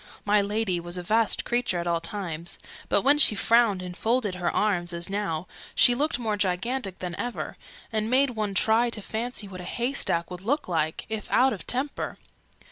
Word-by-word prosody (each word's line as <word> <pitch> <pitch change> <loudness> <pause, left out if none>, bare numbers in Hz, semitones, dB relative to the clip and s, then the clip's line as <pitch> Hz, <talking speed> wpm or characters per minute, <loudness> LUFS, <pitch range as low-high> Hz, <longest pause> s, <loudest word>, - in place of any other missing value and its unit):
My 205 0 +4
Lady 200 -3 -1
was 175 +1 -7
a 180 - -4
vast 220 +4 +2
creature 240 -6 0
at 170 - -3
all 170 -1 0
times: 170 -2 -4 0.3
but, - - +3
when 290 +2 +4
she 225 - +9
frowned 220 -3 +3
and 180 -1 -7
folded 225 -1 0
her 180 -1 -1
arms, 180 -4 0
as 170 +2 -3
now, 190 -5 -2 0.3
she 245 - +6
looked 290 +3 +1
more 225 -3 -1
gigantic 195 +2 -1
than 180 -2 -5
ever, 245 - -4 0.4
and 215 0 -1
made 265 +2 +3
one 215 -4 -3
try 225 +5 +3
to 225 -2 -2
fancy 225 -1 -3
what 185 -2 -8
a - - -8
haystack 235 -7 -1
would 180 0 -7
look 285 +9 -1
like, 160 -3 -1
if 220 -1 -5
out 265 +1 +4
of 195 - -8
temper. 265 +4 -2
210 Hz, 195 wpm, -26 LUFS, 180-240 Hz, 0.4 s, she